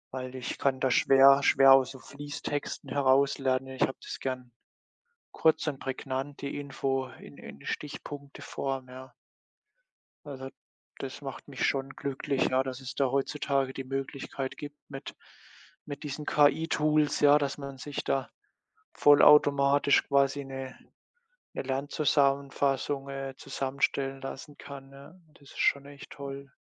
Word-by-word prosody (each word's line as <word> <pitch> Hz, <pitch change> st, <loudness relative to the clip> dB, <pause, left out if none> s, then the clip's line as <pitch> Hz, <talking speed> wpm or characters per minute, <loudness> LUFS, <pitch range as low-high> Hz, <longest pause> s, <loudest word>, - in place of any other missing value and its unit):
Weil 130 Hz, 0 st, -5 dB
ich 125 Hz, -1 st, -5 dB
kann 135 Hz, -1 st, +1 dB
da 130 Hz, 0 st, +1 dB
schwer 135 Hz, +2 st, +6 dB
schwer 135 Hz, -1 st, +7 dB
aus 135 Hz, -1 st, +5 dB
so 135 Hz, -, -10 dB
Fließtexten 145 Hz, 0 st, -6 dB
heraus 140 Hz, +1 st, +3 dB
lernen. 130 Hz, 0 st, 0 dB
Ich 130 Hz, 0 st, -8 dB
habe 130 Hz, -, +1 dB
das -, -, -7 dB
gern 130 Hz, -2 st, -4 dB, 0.8 s
kurz 160 Hz, 0 st, +2 dB
und 145 Hz, -3 st, -2 dB
prägnant, 135 Hz, +1 st, -4 dB
die 140 Hz, 0 st, -4 dB
Info 135 Hz, -2 st, -2 dB
in -, -, -14 dB
in 70 Hz, -, -11 dB
Stichpunkteform, 140 Hz, -2 st, -5 dB
ja. 130 Hz, +1 st, -11 dB, 1.1 s
Also, 135 Hz, -2 st, -7 dB, 0.5 s
das -, -, -6 dB
macht -, -, -8 dB
mich -, -, -1 dB
schon 135 Hz, 0 st, -1 dB
glücklich, 140 Hz, 0 st, -1 dB
ja, 130 Hz, +1 st, +2 dB
dass 130 Hz, -1 st, -5 dB
es 135 Hz, -1 st, -8 dB
da 135 Hz, -3 st, +1 dB
heutzutage 140 Hz, -1 st, 0 dB
die 135 Hz, -, -5 dB
Möglichkeit 135 Hz, 0 st, -5 dB
gibt 145 Hz, 0 st, -8 dB
mit 135 Hz, -1 st, -8 dB, 0.7 s
mit 145 Hz, +1 st, -7 dB
diesen 150 Hz, +1 st, -5 dB
KI-Tools, 150 Hz, 0 st, +2 dB
ja, 145 Hz, 0 st, +7 dB
dass 140 Hz, -2 st, -2 dB
man 140 Hz, -1 st, -7 dB
sich 145 Hz, +2 st, -5 dB
da 135 Hz, -1 st, 0 dB, 0.6 s
vollautomatisch 145 Hz, -1 st, +5 dB
quasi 140 Hz, 0 st, +2 dB
'ne, 135 Hz, -1 st, -7 dB, 0.8 s
'ne -, -, -3 dB
Lernzusammenfassung, 140 Hz, 0 st, 0 dB
äh, 135 Hz, -1 st, -5 dB
zusammenstellen 135 Hz, 0 st, -2 dB
lassen 135 Hz, +2 st, -8 dB
kann, 135 Hz, -1 st, -10 dB
ne? 140 Hz, +7 st, -15 dB, 0.2 s
Das -, -, -21 dB
ist -, -, -11 dB
schon 140 Hz, 0 st, +2 dB
echt 145 Hz, 0 st, -12 dB
toll. 140 Hz, 0 st, -8 dB
140 Hz, 140 wpm, -29 LUFS, 135-145 Hz, 1.1 s, schwer